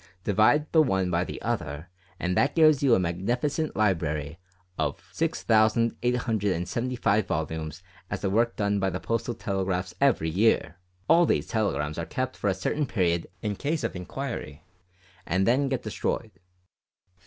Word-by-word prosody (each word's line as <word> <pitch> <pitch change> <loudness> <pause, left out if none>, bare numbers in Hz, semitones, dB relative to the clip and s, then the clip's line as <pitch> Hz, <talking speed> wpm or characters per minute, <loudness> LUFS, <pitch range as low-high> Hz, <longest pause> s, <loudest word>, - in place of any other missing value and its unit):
Divide 110 +10 +3
the 160 - +6
one 95 -10 +1
by 85 +1 +2
the - - -6
other, 75 +4 -3 0.3
and 90 0 -1
that 140 +7 +2
gives 155 -4 +5
you 130 -5 +5
a - - +2
magnificent 120 - -1
library 80 -7 0 0.4
of - - -2
6875 110 -1 +1
volumes 80 +1 -3 0.3
as - - -3
the 95 - 0
work 115 +3 +2
done 100 -1 0
by 95 0 +1
the 90 0 -4
Postal 115 +2 -2
Telegraphs 95 -3 -2
every 115 - +3
year. 95 -1 +2 0.3
All 170 0 +5
these - - +1
telegrams 75 - -1
are 85 - -4
kept 130 +8 -3
for 100 - -1
a 95 - +1
certain 145 +10 -1
period 85 -6 0 0.2
in 105 -2 -1
case 150 +7 -2
of - - -2
inquiry, 90 - -6 0.6
and 95 +2 +1
then 135 +5 +2
destroyed." 115 -2 -2
105 Hz, 145 wpm, -27 LUFS, 90-125 Hz, 0.6 s, the